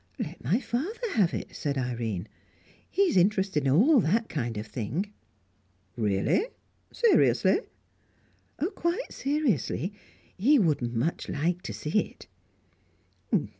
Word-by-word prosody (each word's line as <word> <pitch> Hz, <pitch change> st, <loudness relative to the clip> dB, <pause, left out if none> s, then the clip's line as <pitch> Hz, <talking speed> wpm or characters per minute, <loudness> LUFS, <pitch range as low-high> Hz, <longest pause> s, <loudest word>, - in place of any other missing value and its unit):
"Let 165 Hz, +4 st, -6 dB
my 210 Hz, -, +2 dB
father 330 Hz, -, -3 dB
have 195 Hz, -7 st, +3 dB
it," -, -, -5 dB
said 140 Hz, -3 st, -2 dB
Irene. 115 Hz, -6 st, -2 dB, 0.6 s
"He 395 Hz, -, +2 dB
is 370 Hz, -, +2 dB
interested 190 Hz, -6 st, +2 dB
in -, -, +3 dB
all 250 Hz, -, +6 dB
that 220 Hz, +5 st, +1 dB
kind 120 Hz, -7 st, -3 dB
of 105 Hz, -, -4 dB
thing." 130 Hz, -, -3 dB, 0.8 s
"Really? 105 Hz, -, +1 dB, 0.4 s
Seriously?" 470 Hz, -2 st, +4 dB, 1.1 s
"Quite 345 Hz, +9 st, -2 dB
seriously. 275 Hz, -, 0 dB, 0.4 s
He 270 Hz, +10 st, +4 dB
would 165 Hz, -, +2 dB
much 120 Hz, +7 st, -2 dB
like 170 Hz, +4 st, 0 dB
to -, -, -6 dB
see 155 Hz, +8 st, 0 dB
it." -, -, -6 dB
180 Hz, 120 wpm, -28 LUFS, -, 1.1 s, all